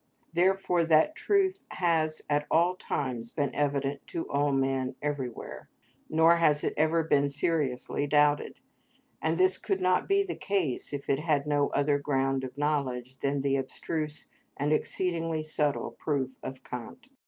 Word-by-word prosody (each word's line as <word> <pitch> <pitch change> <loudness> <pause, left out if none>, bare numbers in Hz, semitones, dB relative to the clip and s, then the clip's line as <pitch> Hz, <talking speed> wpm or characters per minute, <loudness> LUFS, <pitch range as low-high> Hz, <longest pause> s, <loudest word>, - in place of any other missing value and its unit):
Therefore 180 0 +2
that 160 - +4
truth 390 0 +1
has 160 -3 0
at 145 0 0
all 175 +3 +3
times 125 -9 -3
been 145 +3 -2
evident 140 -1 -1
to 165 - -4
all 145 0 +1
men 135 -1 0
everywhere, 140 -5 -5 0.4
nor 160 +2 +5
has 150 -3 +3
it - - 0
ever 160 +2 +2
been 145 -3 +2
seriously 145 -2 -1
doubted; 145 0 +2 0.6
and 160 +1 0
this 185 0 +3
could 195 -3 -1
not 185 0 +2
be 395 0 +4
the 390 - -4
case 185 -10 -1
if 140 -1 -5
it 135 - +2
had 150 -3 +1
no 145 -1 +2
other 145 0 +1
ground 135 -2 0
of 130 +1 -7
knowledge 130 -4 -1
than 140 0 0
the 135 0 +1
abstruse 150 +3 -4 0.3
and 145 +2 +1
exceedingly 165 -1 -1
subtle 150 -2 -1
proof 140 -4 -2
of 130 0 -7
Kant. 125 - -8
150 Hz, 155 wpm, -29 LUFS, 140-165 Hz, 0.6 s, nor